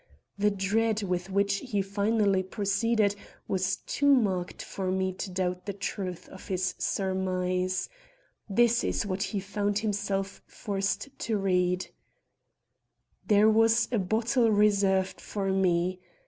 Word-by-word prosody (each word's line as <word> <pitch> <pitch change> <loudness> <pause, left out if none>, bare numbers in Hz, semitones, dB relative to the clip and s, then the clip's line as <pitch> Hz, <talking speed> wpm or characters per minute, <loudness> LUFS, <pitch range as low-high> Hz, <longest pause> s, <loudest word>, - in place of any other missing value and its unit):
The 210 +1 +2
dread 210 +2 0
with 180 -1 -2
which 200 +1 +1
he 205 -4 -2
finally 200 0 +1
proceeded 205 +2 +1 0.3
was 190 0 0
too 285 0 +2
marked 190 -7 -1
for 190 -1 -4
me 190 0 0
to 190 +1 -5
doubt 180 +1 -2
the 200 - -2
truth 190 -2 -5
of 190 - -12
this 185 -1 -1
surmise. 185 -1 -1 0.6
This 235 +3 +3
is - - -1
what 190 -1 -3
he 200 +1 -1
found 205 +1 -1
himself 200 -2 -2
forced 200 +4 -3
to 225 -2 -1
read: 180 -2 0 1.4
"There 210 -1 +5
was 225 +1 +4
a 235 - +1
bottle 225 +5 +2
reserved 200 -2 +2
for 195 -2 -2
me. 185 -1 +1
195 Hz, 130 wpm, -28 LUFS, 185-210 Hz, 1.4 s, There